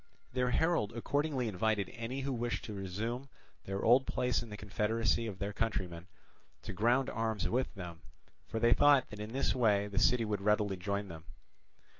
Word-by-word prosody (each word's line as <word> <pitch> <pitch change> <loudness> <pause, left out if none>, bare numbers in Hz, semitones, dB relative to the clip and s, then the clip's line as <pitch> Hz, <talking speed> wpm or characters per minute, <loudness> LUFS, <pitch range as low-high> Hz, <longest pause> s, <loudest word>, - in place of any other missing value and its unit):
Their 125 0 +1
herald 160 -6 +1
accordingly 140 +2 -1
invited 105 0 0
any 120 +4 -4
who 135 0 -2
wished 120 0 -2
to 110 - -6
resume 110 +7 -4 0.4
their 95 0 -3
old 125 +3 +5
place 125 0 0
in 120 - -9
the 105 - -7
confederacy 110 +2 0
of 100 -4 -5
their 100 0 -3
countrymen 90 -6 -2 0.6
to - - -5
ground 120 +7 +2
arms 110 -4 -1
with 130 +2 0
them, 85 -3 -8 0.5
for 110 - -3
they 120 +1 +5
thought 145 -3 +5
that 105 - -8
in 105 +1 -5
this 135 +3 +1
way 105 -5 +3
the 100 -1 -2
city 120 0 +4
would 105 -2 -2
readily 105 -1 +2
join 100 +2 -3
them. 80 -2 -10
110 Hz, 180 wpm, -33 LUFS, 100-125 Hz, 0.6 s, old